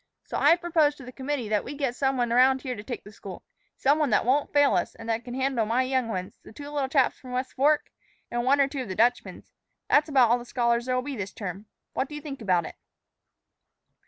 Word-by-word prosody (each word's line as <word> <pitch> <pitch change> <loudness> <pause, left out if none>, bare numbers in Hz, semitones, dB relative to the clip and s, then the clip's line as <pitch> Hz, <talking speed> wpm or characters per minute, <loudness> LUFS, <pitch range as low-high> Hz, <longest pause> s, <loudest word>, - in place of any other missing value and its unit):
So - - -7
I've 335 - +4
proposed 315 -4 +2
to 270 - -11
the 250 - -9
committee 265 -2 -3
that 210 -1 +1
we 285 - -7
get 275 -4 -2
some 270 0 0
one 240 -1 0
about 260 +2 +4
here 255 -3 -3
to 205 - -7
take 240 +3 -6
the 205 - -12
school 195 -2 -10 0.3
some 285 +3 +3
one 300 -3 +2
that 210 - +2
won't 275 +4 +1
fail 285 -4 +4
us, 180 - -1
and 230 - -10
that 225 +1 -1
can 245 0 -7
handle 265 -3 0
my 240 +4 +2
young 260 -2 0
ones, 185 -4 -5
the - - -14
two 285 +5 -9
little 280 -3 -1
chaps 270 -2 +2
from 255 - -12
the - - -6
West 255 +1 -3
Fork, 295 +3 +2 0.4
and 240 0 -1
one 275 +3 +3
or 275 - +4
two 275 -1 -4
of 255 - -6
the 185 - -5
Dutchman's. 240 +4 0 0.4
That's 295 +1 +4
about 255 -5 +4
all 245 - +3
the - - -8
scholars 235 0 0
there'll 255 0 0
be 285 0 -5
this 200 -3 -5
term. 200 +1 -6 0.3
What 265 - -2
do 300 - -7
you 295 - -6
think 280 -4 -7
about 180 -5 +1
it?" - - -9
255 Hz, 255 wpm, -26 LUFS, 230-280 Hz, 0.4 s, I've